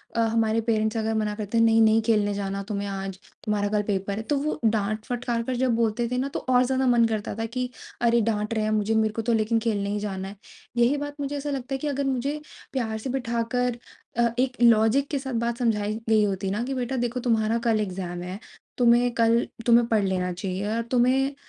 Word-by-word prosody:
अ, - - 0
हमारे 225 0 +2
पेरेंट्स 220 -1 0
अगर 220 0 0
मना 215 -1 0
करते 210 +1 -3
हैं, 230 - +5
"नहीं, 225 0 +5
नहीं 220 0 +5
खेलने 210 -2 +2
जाना 200 0 -3
तुम्हें 205 -1 -3
आज, 195 -1 -5 0.3
तुम्हारा 210 -2 0
कल 210 0 +1
पेपर 200 0 -1
है।" - - -2
तो 290 +5 0
वो 300 +2 -2
डाँट-फटकार 225 +3 -1
कर 255 +2 -2
जब 255 0 +1
बोलते 230 +1 0
थे 250 - 0
ना 260 +2 0
तो - - 0
और 250 0 +5
ज़्यादा 265 +1 +1
मन 240 -2 +5
करता 220 -2 -2
था 225 - -1
कि 250 0 -1 0.3
अरे 235 0 +4
डाँट 210 0 -1
रहे 220 -1 0
हैं 215 - 0
मुझे 215 +1 +1
मेरे 220 -1 +2
को 225 - -2
तो 235 +1 0
लेकिन 225 +1 +2
खेलने 210 -3 -1
ही 205 +1 -1
जाना 195 -2 -4
है। 200 - -9 0.4
यही 240 +4 +3
बात 290 0 -5
मुझे 285 0 -3
ऐसा 290 +1 -4
लगता 270 -1 -4
है - - 0
कि 300 - -3
अगर 280 -1 -1
मुझे 270 +3 -1 0.3
प्यार 225 -5 -1
से 220 +4 -5
बिठाकर 245 -1 -1 0.4
अ, 235 0 +4
एक 255 0 +1
लॉजिक 235 +4 +5
के 285 - -1
साथ 265 -1 -5
बात 235 0 -1
समझाई 215 -3 0
गई 215 -1 +5
होती 195 -1 -1
ना, 210 +4 -1
कि, 265 +2 -3
"बेटा 255 0 -2
देखो 245 +1 -1
तुम्हारा 225 -2 +1
कल 225 -2 +3
एग्ज़ाम 180 -3 -4
है, 180 +3 -6 0.4
तुम्हें 240 0 +4
कल 230 0 +3 0.2
तुम्हें 235 0 +5
पढ़ 220 -3 +2
लेना 185 -1 0
चाहिए, 185 +1 -4
या 220 +2 -1
तुम्हें 255 +3 +2
225 Hz, 230 wpm, -25 LUFS, 210-245 Hz, 0.4 s, हैं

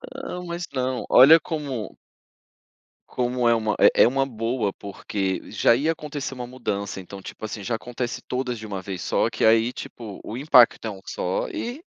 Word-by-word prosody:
Ah, 180 -9 -6
mas 170 0 -5
não, 130 -1 -2
olha 155 +6 +8
como 145 -9 -5 1.1
como 125 -1 0
é 115 - +5
uma 110 -2 0
é - - +6
é - - +6
uma 135 +2 +1
boa, 115 -3 -2
porque 100 -1 -4
já - - +3
ia 155 +6 +1
acontecer 145 -3 -6
uma 125 -1 -6
mudança. 100 -6 -4
Então, 95 +1 -10
tipo 110 - -11
assim, 105 -1 -6
já 115 +2 -1
acontece 120 +1 -5
todas 125 -2 -3
de 110 - -8
uma 100 -2 -5
vez 95 -2 -6
só - - +1
que - - 0
aí, 115 +2 +4
tipo, 110 -4 -8
o 115 - -6
impacto 125 -5 +5
é 110 - -2
um 95 - -10
só 90 - -2
e 245 +7 -5
120 Hz, 185 wpm, -24 LUFS, 105-135 Hz, 1.1 s, olha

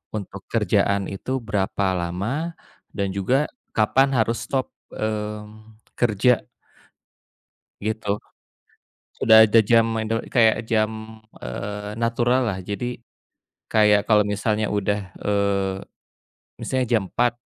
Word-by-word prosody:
untuk 100 -3 -6
kerjaan 100 -1 +1
itu 100 +6 -6
berapa 100 -3 -1
lama, 110 - -3 0.4
dan 100 -1 0
juga 130 +9 +2 0.3
kapan 135 +5 +3
harus 115 +1 +1
stop, 130 -2 -1 0.2
mmm, 105 0 -5 0.2
kerja 120 +1 +2 1.4
gitu. 105 -1 -2 1.0
Udah 110 0 +8
ada 110 +1 +5
jam 115 +1 +4 0.2
indel 115 +1 -2
kayak 115 -2 +3
jam, 110 0 -2 0.2
eee, 105 +11 -5
naturallah. 120 -3 +1
Jadi, 120 +5 -4 0.7
kayak 105 -2 +4
kalau 105 -1 +5
misalnya 105 +1 0
udah, 105 0 0 0.2
eee, 100 -1 0 0.9
misalnya 130 -1 -1
jam - - -5
4.00, 120 -1 +1
110 Hz, 105 wpm, -23 LUFS, 105-115 Hz, 1.4 s, Udah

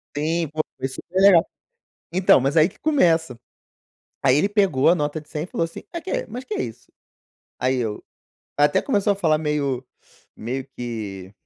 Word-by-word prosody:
Sim, 160 +3 0
pô, 155 +1 -1 0.2
foi 135 - -2
super 175 +7 -4
legal. 185 -3 +7 0.7
Então, 185 -6 +5
mas 135 +4 0
aí 160 +2 +6
que - - -19
começa. 165 - +2 0.8
Aí 130 +1 +4
ele 195 - +2
pegou 195 -11 +2
a 170 - +6
nota 150 -1 -2
de 150 - -20
100, 155 +2 -4
falou 170 - -1
assim: 165 - -7
"Ah, 340 - -4
que, - - -3
mas 250 +2 -7
que 215 - -5
é - - -1
isso?". 120 0 -9 0.7
Aí 130 +2 +1
eu 110 -4 -3 0.5
até 145 0 +3
começou 205 -5 +1
a - - -4
falar 160 -5 +2
meio 145 -4 -1 0.5
meio 130 +4 -4
que, 105 -6 -6
155 Hz, 180 wpm, -23 LUFS, 130-185 Hz, 0.8 s, legal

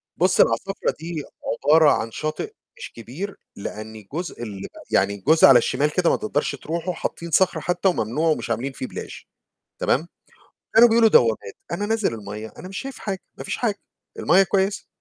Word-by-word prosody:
بُصّ، 185 +2 +2
العصافرة 195 0 +1
دي 160 -2 -5 0.4
عبارة 155 0 +6
عن 115 - -1
شاطئ 155 - -4 0.2
مش - - -8
كبير 135 - -7 0.2
لأن 110 +1 -7
جزء 170 -7 -5
الب 100 -3 -6 0.2
يعني 100 0 +2
جزء 160 -1 +7
على 135 -2 +8
الشمال 150 +5 +1
كده 175 0 +2
ما - - +3
تقدرش 210 -8 -1
ترُوحه، 170 +6 -3
حاطّين 170 0 -5
صخر 190 +4 +3
حتى 180 +2 0
وممنوع، 155 +2 0
ومش 155 - -1
عاملين 125 +4 -1
فيه 130 - -6
plage - - -8 0.6
تمام، 155 +6 +1 0.6
وكانوا 235 +1 +7
بيقولوا 225 0 +5
دوّامات، 115 - +3 0.2
أنا 205 +4 -2
نازل 220 - 0
المَيّة، 105 +1 -7
أنا 185 - -8
مش 190 - -6
شايف 270 0 -6
حاجة، 195 -3 -4 0.2
ما - - -6
فيش - - -3
حاجة، 215 -4 -1 0.4
المَيّة 190 +2 +5
كويسة. 195 +1 0
165 Hz, 170 wpm, -23 LUFS, 120-195 Hz, 0.6 s, على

